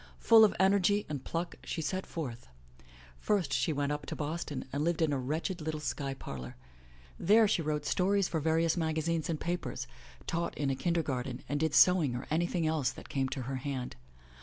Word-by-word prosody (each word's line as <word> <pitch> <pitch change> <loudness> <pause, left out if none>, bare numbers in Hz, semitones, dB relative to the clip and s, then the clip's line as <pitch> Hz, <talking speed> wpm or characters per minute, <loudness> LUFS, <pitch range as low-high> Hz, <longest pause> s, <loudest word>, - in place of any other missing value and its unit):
Full 225 -1 +7
of 210 - +4
energy 200 +1 +3
and 145 -3 -4
pluck, 170 +1 -3
she - - -4
set 185 +4 -2
forth. 125 - -6 0.7
First 180 -10 0
she 130 +5 +1
went 145 -1 -1
up 145 -1 -4
to - - -4
Boston 150 -2 -4
and 145 +1 0
lived 170 0 0
in 160 -3 +2
a 135 - 0
wretched 160 +7 -2
little 155 0 -3
sky 140 -2 -3
parlor. 65 - -7 0.6
There 215 +4 +5
she 195 - +1
wrote 150 -1 -2
stories 185 +7 +2
for 160 - -1
various 160 +1 +2
magazines 160 -1 -1
and 160 -2 -1
papers, 150 -7 -3 0.4
taught 170 +1 -2
in 140 -2 0
a - - 0
kinder 170 +3 0
garten 130 -3 -3
and 145 - -1
did 160 -1 +1
sewing 170 -9 +5
or 125 - -5
any 170 +3 +2
thing 175 -2 -1
else 155 -5 +1
that - - -10
came 135 -1 0
to 130 - -4
her 130 +2 -3
hand. 130 -2 -4
155 Hz, 200 wpm, -31 LUFS, 140-170 Hz, 0.7 s, Full